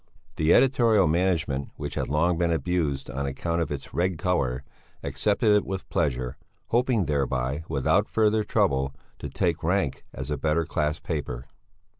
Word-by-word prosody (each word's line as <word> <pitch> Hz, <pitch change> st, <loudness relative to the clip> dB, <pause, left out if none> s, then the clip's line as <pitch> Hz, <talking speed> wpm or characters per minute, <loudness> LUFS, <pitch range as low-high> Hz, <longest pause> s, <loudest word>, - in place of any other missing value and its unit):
The 80 Hz, +2 st, +3 dB
editorial 115 Hz, -6 st, +5 dB
management, 80 Hz, -5 st, 0 dB
which -, -, -5 dB
had -, -, -2 dB
long 85 Hz, +5 st, +2 dB
been 85 Hz, -1 st, +2 dB
abused 80 Hz, -5 st, -1 dB
on 70 Hz, +1 st, -3 dB
account 85 Hz, +5 st, -2 dB
of 80 Hz, -, -2 dB
its 70 Hz, -2 st, -6 dB
red 90 Hz, 0 st, 0 dB
colour, 70 Hz, -9 st, 0 dB, 0.4 s
accepted 100 Hz, -, +2 dB
it 105 Hz, -, +3 dB
with 95 Hz, -1 st, -5 dB
pleasure, 65 Hz, -7 st, -1 dB, 0.3 s
hoping 120 Hz, -4 st, +2 dB
thereby, 70 Hz, 0 st, -1 dB
without 80 Hz, +8 st, +2 dB
further 110 Hz, -1 st, +2 dB
trouble, 70 Hz, -7 st, +1 dB, 0.2 s
to 70 Hz, -, -5 dB
take 85 Hz, +2 st, 0 dB
rank 85 Hz, -5 st, 0 dB
as 65 Hz, +3 st, -6 dB
a 75 Hz, -, -1 dB
better 80 Hz, +2 st, +1 dB
class 75 Hz, 0 st, -1 dB
paper. 70 Hz, -9 st, -4 dB
80 Hz, 155 wpm, -26 LUFS, 70-95 Hz, 0.4 s, editorial